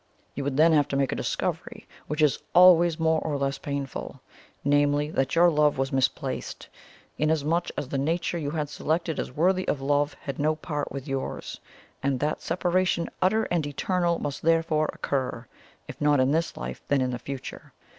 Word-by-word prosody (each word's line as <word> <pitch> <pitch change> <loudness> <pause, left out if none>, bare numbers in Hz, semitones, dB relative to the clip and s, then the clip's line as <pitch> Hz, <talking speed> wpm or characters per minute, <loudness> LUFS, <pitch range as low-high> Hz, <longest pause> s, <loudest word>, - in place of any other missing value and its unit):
You 140 - -4
would 140 -1 -2
then 160 +2 +6
have 145 -2 +4
to 140 - -3
make 135 -1 +1
a - - -1
discovery, - - -3 0.2
which 150 +1 0
is 150 - +3 0.2
always 175 -2 +7
more 160 -1 +2
or 150 -3 -2
less 140 0 -2
painful 140 -2 -5 0.5
namely, 145 +1 +2
that 135 -1 0
your 175 +1 +6
love 150 -2 +3
was 135 0 -1
misplaced, 130 -1 -2 0.5
inasmuch 160 +2 +1
as 145 - -3
the 140 - -1
nature 170 +4 -1
you 145 -3 -3
had 150 -1 -2
selected 160 +3 -2
as - - -3
worthy 185 +7 +1
of 145 - 0
love 145 +1 +1
had 140 -2 -7
no 155 +2 +2
part 150 -2 -4
with 140 +1 -6
yours; 135 -1 -4 0.4
and 135 -1 0
that 150 +3 -1
separation 180 0 0
utter 215 +5 +3
and 165 -4 +1
eternal 170 +4 0
must 145 0 -4
therefore 165 -1 +2
occur, 130 -3 -3 0.4
if - - -10
not 145 -1 +4
in 130 +1 +3
this 165 +2 0
life, - - -6
then 140 -2 +2
in 130 0 0
the 125 - -4
future. 135 +1 -8
150 Hz, 185 wpm, -26 LUFS, 140-165 Hz, 0.5 s, always